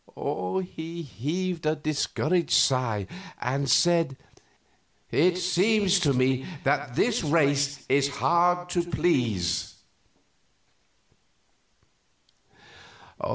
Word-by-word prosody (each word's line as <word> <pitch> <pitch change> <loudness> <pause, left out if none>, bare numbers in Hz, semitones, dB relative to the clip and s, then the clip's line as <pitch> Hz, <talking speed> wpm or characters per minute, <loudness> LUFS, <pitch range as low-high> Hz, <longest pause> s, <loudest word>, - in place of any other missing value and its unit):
He 165 0 -7
heaved 165 +7 -4
a 155 - +2
discouraged 155 +2 -1
sigh, 115 -6 +1 0.3
and 135 +2 -2
said, 165 -3 +3 0.9
"It 180 +4 +3
seems 190 +2 +2
to 155 -6 +2
me 130 0 +1 0.2
that 140 -2 0
this 225 - +1
race 145 -2 +1
is 140 +1 +2
hard 175 +4 +1
to 175 - +1
please." 120 - -1
155 Hz, 80 wpm, -26 LUFS, 135-175 Hz, 0.9 s, said